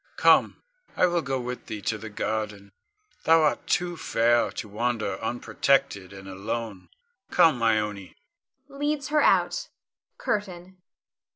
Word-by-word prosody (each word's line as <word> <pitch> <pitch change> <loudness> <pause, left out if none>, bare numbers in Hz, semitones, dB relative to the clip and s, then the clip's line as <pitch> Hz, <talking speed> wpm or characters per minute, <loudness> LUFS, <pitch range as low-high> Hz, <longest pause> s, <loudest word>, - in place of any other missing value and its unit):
Come, - - +4 0.3
I - - +5
will 175 -1 +1
go 135 -3 -2
with 125 0 -6
thee 110 -3 -6
to 110 - -1
the 110 +1 -8
garden; 105 -2 -4 0.5
thou 165 0 +5
art 150 - 0
too 175 -1 0
fair 120 -5 +2
to 110 - -6
wander 115 +2 -2
unprotected 120 -4 0
and 95 0 -11
alone. 100 +1 -5 0.4
Come, 145 -8 +4
Ione 105 -4 0 0.5
[leads 290 0 -2
her 300 0 +3
out]. - - +2 0.5
CURTAIN. 185 -3 -4
120 Hz, 125 wpm, -26 LUFS, 105-175 Hz, 0.5 s, I